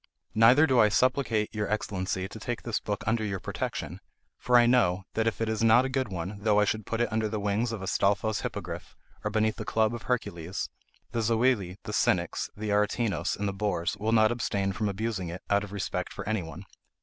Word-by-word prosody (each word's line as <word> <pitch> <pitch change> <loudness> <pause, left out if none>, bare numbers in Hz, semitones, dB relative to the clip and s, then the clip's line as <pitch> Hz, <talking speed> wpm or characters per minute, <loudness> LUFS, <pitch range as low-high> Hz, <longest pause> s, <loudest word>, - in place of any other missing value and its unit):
Neither 120 +7 +6
do 130 -5 +3
I 105 -2 +6
supplicate 120 -2 +1
your 105 -1 -2
Excellency 95 -3 -2
to 110 - -10
take 120 +2 -4
this 115 -3 -1
book 105 -1 -4
under 110 0 +1
your 100 -3 -2
protection, - - -4 0.4
for 125 0 +4
I 120 - +6
know, 105 -7 +3
that 110 0 0
if 115 - -1
it 115 - +1
is 110 0 -1
not 115 +3 +6
a - - -2
good 130 -1 -1
one, 95 +1 -5
though 105 0 +3
I 105 - +4
should 110 0 -2
put 115 0 -1
it 120 - 0
under 110 -1 0
the 105 0 -2
wings 105 +3 0
of 110 -4 -5
Astolfo's 100 +2 +1
hippogrif, - - -6 0.3
or 105 - 0
beneath 110 0 +1
the 110 - -4
club 110 +1 +1
of 120 - -5
Hercules, 95 -8 -3 0.4
the 115 - -1
Zoili, 110 -4 +1
the - - -6
cynics, - - +1
the 105 0 -3
Aretinos, 105 -3 +1
and 105 - -1
the 100 - -2
bores, 95 -3 -1
will 110 +2 -1
not 110 -1 +5
abstain 100 -5 -1
from 105 +1 -1
abusing 100 -3 -3
it, 90 +3 -7
out 100 0 +3
of 105 - -8
respect 100 -2 -3
for - - -7
anyone. 95 -4 -3
110 Hz, 215 wpm, -28 LUFS, 100-115 Hz, 0.4 s, Neither